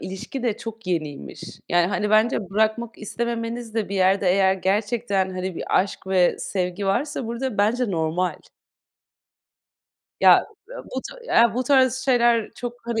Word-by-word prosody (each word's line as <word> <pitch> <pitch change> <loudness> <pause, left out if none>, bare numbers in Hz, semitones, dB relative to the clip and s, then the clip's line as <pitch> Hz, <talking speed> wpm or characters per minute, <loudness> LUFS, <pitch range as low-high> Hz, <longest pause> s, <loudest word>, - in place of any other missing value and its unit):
ilişki 195 +7 -6
de 230 -4 0
çok 225 -2 -9
yeniymiş. 150 - -4 0.3
Yani, 175 0 +3
hani, 205 +2 -1
bence 215 -2 +2
bırakmak 220 +3 0
istememeniz 230 +1 -4
de 220 -3 -1
bir 200 - -4
yerde 190 0 +3
eğer 190 0 +4
gerçekten, 200 0 0
hani, 185 0 -4
bir - - -1
aşk 195 0 -6
ve 185 -2 +2
sevgi 185 +1 -3
varsa 265 +6 -1
burada 235 0 -4
bence 225 +3 +1
normal. 170 +1 -1 1.9
Ya, - - +7 0.3
u - - -9
bu - - -5
ta 480 - +1
bu 255 - 0
tarz 260 -1 +4
şeyler 240 -4 +2
çok, 245 -1 -5
hani, 235 -1 -1
215 Hz, 150 wpm, -23 LUFS, 190-235 Hz, 1.9 s, Ya